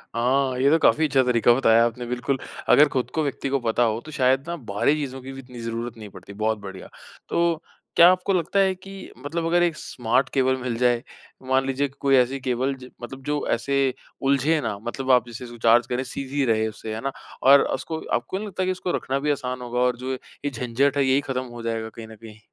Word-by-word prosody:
हाँ, 130 +2 +1
ये 135 +2 +4
तो 160 - +5
काफ़ी 160 0 +4
अच्छा 135 -2 +3
तरीका 120 -1 +4
बताया 115 -2 +4
आपने 120 +1 -3
बिल्कुल, 125 +3 -1 0.3
अगर 145 +5 +7
खुद 130 -3 -1
को 160 - +1
व्यक्ति 140 -1 -3
को 140 0 +1
पता 120 0 +1
हो 110 -1 +1
तो 155 - -9
शायद 135 0 +2
ना 170 - -3 0.2
बाहरी 105 +9 +2
चीज़ों 135 -3 -4
की 130 +1 -8
भी 135 - -9
इतनी 125 -2 -12
ज़रूरत 115 0 -4
नहीं 105 -2 -9
पड़ती, 100 - -12
बहुत 110 +2 0
बढ़िया। 95 -2 -9 0.4
तो 170 -1 +1 0.3
क्या 170 +1 +9
आपको 185 +1 0
लगता 180 +2 +1
है 190 -1 +3
कि 195 +2 -12 0.3
मतलब 165 +3 -2
अगर 175 +1 +3
एक 170 -2 +1
स्मार्ट 125 0 0
केबल 130 -1 +2
मिल 125 -2 -2
जाए। 120 0 +2 0.4
मान 130 0 +2
लीजिए 135 +1 0
कि 135 - -19
कोई 135 -1 +3
ऐसी 130 +1 +2
केबल 130 +1 -1
जे 130 -1 -12
मतलब 135 +3 -8
जो 145 +1 -2
ऐसे 140 +4 0 0.4
उलझे 140 +4 +2
ना, 105 -6 -3
मतलब 130 +4 -2
आप 125 -2 +4
जैसे 120 +1 -8
इसको 120 0 -10
चार्ज 115 +1 +4
करें 125 +1 -1
सीधी 135 +2 -3
रहे 110 -2 +2
उससे, 110 0 -6
है 110 - -5
ना? 135 - -2 0.3
और 140 +1 +8
उसको 160 -1 -4
आपको 120 +10 -1
नहीं 210 +2 -5
लगता 190 -1 -2
कि 185 - +1
उसको 185 -1 -3
रखना 135 +1 -2
भी 150 +1 0
आसान 130 -3 -3
होगा 125 0 -3
और 125 -1 +2
जो 130 +2 -4
है 130 - -2 0.3
ये 145 - 0
झंझट 130 +3 0
है 140 - +3
यही 135 +1 +3
खत्म 130 -2 -3
हो 120 -1 -9
जाएगा 115 -1 -3
कहीं 110 0 -10
न 110 - -12
कहीं? 110 0 -13
130 Hz, 235 wpm, -24 LUFS, 120-140 Hz, 0.4 s, क्या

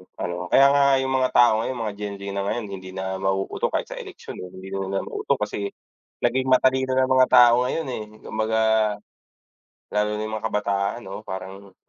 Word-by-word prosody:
ano 90 0 -4
kaya 135 +7 +6
nga 140 0 +4 0.2
yung 130 - -2
mga 130 -1 +2
tao 120 -3 +6
ngayon 130 +3 -2
mga 105 -2 -3
Gen 100 -1 -4
Z 100 - -11
na 100 0 -2
ngayon 115 -2 -2
hindi 95 -1 -8
na 95 0 -3
mauuto 95 0 -1
kahit - - -3
sa - - -6
eleksyon, - - -9
eh, 90 - -6
hindi 95 +1 -10
naman 95 0 -2
mauto - - -1
kasi 100 -1 -3 0.6
naging 130 +2 +1
matalino 130 0 +3
ng 130 0 +2
mga 130 - +6
tao 125 0 +6
ngayon, 160 0 -2
eh, 110 - -4 0.2
kumbaga, 110 0 -1 1.3
lalo 105 0 +1
na 105 - -3
yung 110 0 -4
mga 110 - -4
kabataan 100 +1 -1
'no, 100 +3 -9
parang 95 +1 -8
105 Hz, 190 wpm, -24 LUFS, 95-125 Hz, 1.3 s, kaya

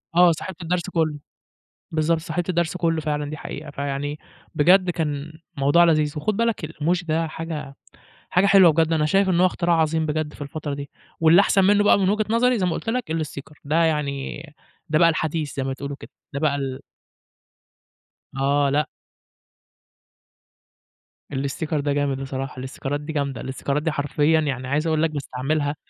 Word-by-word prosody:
آه، 175 0 +7
صاحبت 175 +3 -6
الدرس 175 +2 -2
كلّه. 155 -4 0 0.7
بالضبط، 160 +1 +1
صاحبت 175 +1 -3
الدرس 175 0 0
كلّه 165 -2 0
فعلًا 150 -1 -2
دي 155 - -6
حقيقة. 150 0 -7
فيعني 140 +1 -3 0.4
بجد 180 +4 +5
كان 155 -2 -3 0.2
موضوع 145 +5 +5
لذيذ، 155 -3 +2
وخُد 200 +7 -1
بالك 230 -6 0
الإيموجي 165 +3 -1
ده 165 +1 0
حاجة 155 -3 -6 0.5
حاجة 180 +2 +3
حلوة 195 -4 +7
بجد 160 +1 +2
أنا 155 -1 +2
شايف 195 +5 +3
إن 175 -2 +2
هو 185 - +6
اختراع 175 -1 +1
عظيم 160 0 +1
بجد 155 0 -2
في - - -13
الفترة 145 0 -5
دي، 140 0 -6 0.3
واللي 165 +4 +6
احسن 195 -1 +3
منُّه 205 +1 +4
بقى 205 - +5
من 190 - +2
وجهة 215 +1 +1
نظري 240 +1 +3
زي 185 - +1
ما 175 - 0
قُلت 225 - -4
لك، 235 -7 -2
الإستيكر. 150 -2 -5
ده 160 +4 +2
يعني 145 -3 -1 0.5
ده 155 0 +2
بقى 170 - +6
الحديث 160 -2 -2
زي 135 - -2
ما 135 - -2
بتقولوا 140 +1 -5
كده، - - -12 0.2
ده 140 - -2
بقى 145 -2 +1
ال 135 -2 -4 1.6
آه، 140 +1 +2
لأ. 150 +2 +1 2.4
الاستيكر 140 +3 -2
ده 145 0 0
جامد 140 -2 -1
بصراحة. 135 -1 -5
الاستيكرات 135 +2 -4
دي 155 +1 -6
جامدة. 140 -2 -2
الاستيكرات 140 +3 -2
دي 160 - 0
حرفيًا 150 +2 +2
يعني 130 -3 -3
عايز 150 +4 0
اقول 160 -1 +1
لك 165 - +2
باستعملها، 145 +1 -2
155 Hz, 175 wpm, -23 LUFS, 145-170 Hz, 2.4 s, آه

